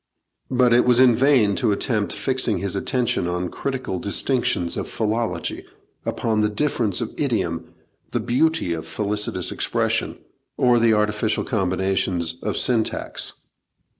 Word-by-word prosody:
But 125 Hz, -2 st, +3 dB
it 120 Hz, -, +5 dB
was 125 Hz, -1 st, +4 dB
in 125 Hz, -3 st, +6 dB
vain 125 Hz, -5 st, +4 dB
to 105 Hz, -, +2 dB
attempt 105 Hz, 0 st, 0 dB
fixing 130 Hz, -6 st, 0 dB
his 100 Hz, +1 st, -1 dB
attention 120 Hz, -2 st, 0 dB
on 90 Hz, 0 st, -2 dB
critical 130 Hz, -9 st, -3 dB
distinctions 100 Hz, -5 st, 0 dB
of -, -, -4 dB
philology, 110 Hz, +1 st, -2 dB, 0.4 s
upon 110 Hz, -2 st, 0 dB
the 105 Hz, 0 st, +2 dB
difference 110 Hz, -3 st, 0 dB
of 115 Hz, -, -4 dB
idiom, 105 Hz, -, -2 dB, 0.3 s
the -, -, -1 dB
beauty 145 Hz, -, +1 dB
of 80 Hz, -1 st, -6 dB
felicitous 105 Hz, -4 st, -1 dB
expression, -, -, -1 dB, 0.4 s
or 125 Hz, -1 st, +4 dB
the 115 Hz, -1 st, +4 dB
artificial 105 Hz, +1 st, 0 dB
combinations 95 Hz, -5 st, 0 dB
of 105 Hz, -, -2 dB
syntax. 115 Hz, -3 st, 0 dB
110 Hz, 135 wpm, -22 LUFS, 95-125 Hz, 0.4 s, in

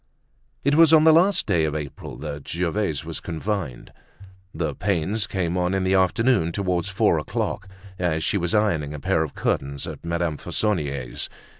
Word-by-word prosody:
It 140 Hz, -, +2 dB
was 160 Hz, +1 st, +6 dB
on 155 Hz, -1 st, +7 dB
the 160 Hz, 0 st, +7 dB
last 180 Hz, +4 st, +4 dB
day 85 Hz, -6 st, +2 dB
of 75 Hz, -1 st, -1 dB
April 75 Hz, -3 st, -6 dB
that 75 Hz, -1 st, -7 dB
Gervaise 85 Hz, -2 st, -1 dB
was -, -, -5 dB
confined. 85 Hz, -, -4 dB, 0.6 s
The -, -, -2 dB
pains 100 Hz, +3 st, -1 dB
came 90 Hz, -3 st, -1 dB
on 90 Hz, +2 st, +1 dB
in 95 Hz, -, 0 dB
the 95 Hz, +1 st, +1 dB
afternoon, 95 Hz, 0 st, +3 dB
towards 90 Hz, -1 st, -1 dB
four 95 Hz, -, +2 dB
o'clock, 100 Hz, -, -3 dB, 0.3 s
as 80 Hz, -3 st, 0 dB
she -, -, +1 dB
was 85 Hz, +3 st, 0 dB
ironing 80 Hz, -9 st, +1 dB
a -, -, -6 dB
pair 70 Hz, -, +1 dB
of 80 Hz, -3 st, -3 dB
curtains 70 Hz, 0 st, -1 dB
at -, -, -8 dB
Madame 85 Hz, -2 st, -1 dB
Fauconnier's. 70 Hz, -, -2 dB
90 Hz, 170 wpm, -24 LUFS, 80-105 Hz, 0.6 s, on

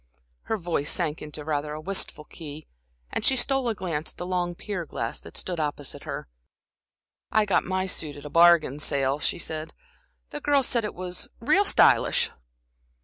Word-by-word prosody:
Her 220 Hz, -, 0 dB
voice 165 Hz, -5 st, -1 dB
sank 160 Hz, -3 st, 0 dB
into 150 Hz, 0 st, -7 dB
rather 150 Hz, -1 st, -1 dB
a 155 Hz, -, -5 dB
wistful 185 Hz, -2 st, -2 dB
key, 150 Hz, -1 st, -9 dB, 0.5 s
and -, -, -2 dB
she 265 Hz, -, +5 dB
stole 265 Hz, 0 st, +2 dB
a 225 Hz, -, -1 dB
glance 165 Hz, -5 st, -3 dB
at -, -, -32 dB
the 175 Hz, -, -4 dB
long 180 Hz, -1 st, -1 dB
pier 200 Hz, -1 st, -4 dB
glass 115 Hz, -7 st, -4 dB
that -, -, -9 dB
stood 175 Hz, -3 st, -1 dB
opposite 145 Hz, -2 st, -3 dB
her. -, -, -5 dB, 1.0 s
"I 215 Hz, -1 st, +4 dB
got 200 Hz, -, +2 dB
my 185 Hz, +1 st, 0 dB
suit 155 Hz, -5 st, -2 dB
at 145 Hz, -, -11 dB
a -, -, -5 dB
bargain 165 Hz, -4 st, +6 dB
sale," 140 Hz, -1 st, +1 dB
she -, -, 0 dB
said. 160 Hz, -1 st, -5 dB, 0.6 s
"The 295 Hz, -, -4 dB
girls 280 Hz, -2 st, +3 dB
said 235 Hz, -2 st, +2 dB
it 210 Hz, -, -4 dB
was 180 Hz, 0 st, -3 dB
real 380 Hz, -, +4 dB
stylish." -, -, +4 dB
170 Hz, 180 wpm, -26 LUFS, 150-195 Hz, 1.0 s, bargain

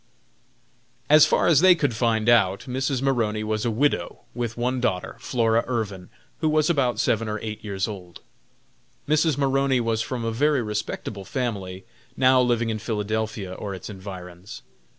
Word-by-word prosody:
As 155 Hz, 0 st, +8 dB
far -, -, +2 dB
as 160 Hz, -5 st, +5 dB
they 185 Hz, -1 st, +7 dB
could 145 Hz, -7 st, 0 dB
find 110 Hz, -1 st, 0 dB
out, 100 Hz, -5 st, +4 dB
Mrs. 130 Hz, 0 st, -2 dB
Maroney 115 Hz, -6 st, 0 dB
was 110 Hz, +1 st, -2 dB
a -, -, +2 dB
widow, 135 Hz, +7 st, 0 dB
with 120 Hz, -1 st, -4 dB
one 125 Hz, +1 st, -1 dB
daughter, 90 Hz, -7 st, -1 dB
Flora 115 Hz, -2 st, +1 dB
Irvin, 105 Hz, -7 st, -3 dB, 0.3 s
who 155 Hz, -, +1 dB
was 155 Hz, +1 st, +2 dB
about 125 Hz, -8 st, 0 dB
seven 115 Hz, -1 st, +1 dB
or 105 Hz, -, -2 dB
eight 110 Hz, 0 st, -6 dB
years 100 Hz, -3 st, -2 dB
old. 90 Hz, -5 st, -9 dB, 0.9 s
Mrs. 155 Hz, -1 st, +2 dB
Maroney 135 Hz, -1 st, +2 dB
was 115 Hz, -1 st, 0 dB
from 120 Hz, 0 st, -4 dB
a 115 Hz, -, -1 dB
very 140 Hz, +2 st, +1 dB
respectable 105 Hz, -1 st, -4 dB
family, 95 Hz, -6 st, -4 dB, 0.3 s
now 130 Hz, 0 st, +5 dB
living 120 Hz, -2 st, +1 dB
in 110 Hz, -, -3 dB
Philadelphia 110 Hz, -2 st, -3 dB
or 100 Hz, +1 st, -5 dB
its 95 Hz, +3 st, -8 dB
environs. 95 Hz, 0 st, -9 dB
115 Hz, 160 wpm, -24 LUFS, 105-130 Hz, 0.9 s, As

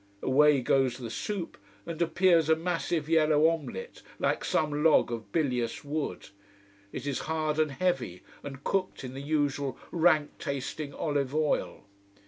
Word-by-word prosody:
Away 145 Hz, +1 st, +4 dB
goes 130 Hz, 0 st, +2 dB
the 120 Hz, -4 st, -6 dB
soup 195 Hz, -, -4 dB, 0.3 s
and 170 Hz, 0 st, -5 dB
appears 170 Hz, -2 st, +3 dB
a 160 Hz, -, +6 dB
massive 165 Hz, -2 st, -2 dB
yellow 155 Hz, -1 st, +4 dB
omelette, 165 Hz, -, -4 dB, 0.2 s
like -, -, 0 dB
some 150 Hz, -1 st, 0 dB
log 160 Hz, -6 st, +4 dB
of 115 Hz, -2 st, -6 dB
bilious 125 Hz, -8 st, -1 dB
wood. 145 Hz, -, -4 dB, 0.6 s
It -, -, -6 dB
is 140 Hz, -2 st, -1 dB
hard, 155 Hz, -1 st, 0 dB
and 155 Hz, -1 st, +3 dB
heavy, 135 Hz, -, -2 dB, 0.2 s
and 140 Hz, -1 st, -8 dB
cooked 185 Hz, -6 st, -1 dB
in 130 Hz, -1 st, -6 dB
the 135 Hz, -, -6 dB
usual 145 Hz, -2 st, -1 dB
rank 160 Hz, -3 st, +3 dB
tasting 140 Hz, +2 st, -4 dB
olive 145 Hz, -2 st, -2 dB
oil. 155 Hz, -1 st, 0 dB
150 Hz, 145 wpm, -29 LUFS, 135-160 Hz, 0.6 s, a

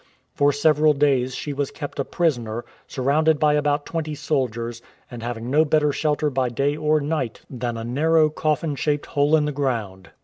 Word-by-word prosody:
For 145 Hz, 0 st, +3 dB
several 150 Hz, +1 st, +3 dB
days 135 Hz, -3 st, +1 dB
she 145 Hz, -, -4 dB
was 140 Hz, -1 st, -2 dB
kept 145 Hz, -2 st, -7 dB
a -, -, +2 dB
prisoner, 120 Hz, -9 st, -1 dB, 0.2 s
surrounded 150 Hz, +4 st, +2 dB
by 150 Hz, 0 st, +3 dB
about 145 Hz, 0 st, +1 dB
twenty 155 Hz, -2 st, -3 dB
soldiers, 120 Hz, -5 st, -2 dB, 0.3 s
and 120 Hz, -1 st, -7 dB
having 120 Hz, +1 st, -5 dB
no 155 Hz, +3 st, +5 dB
better 150 Hz, -1 st, +2 dB
shelter 150 Hz, 0 st, 0 dB
by 130 Hz, -1 st, 0 dB
day 140 Hz, +5 st, 0 dB
or 155 Hz, 0 st, +2 dB
night 145 Hz, -6 st, -3 dB
than 120 Hz, -2 st, -3 dB
a 115 Hz, -, -5 dB
narrow 155 Hz, +6 st, +2 dB
coffin 155 Hz, 0 st, -1 dB
shaped 145 Hz, +1 st, -1 dB
hole 145 Hz, +2 st, +2 dB
in 150 Hz, -1 st, +2 dB
the 150 Hz, -, -1 dB
ground. 110 Hz, -, -3 dB
145 Hz, 180 wpm, -23 LUFS, 125-150 Hz, 0.3 s, no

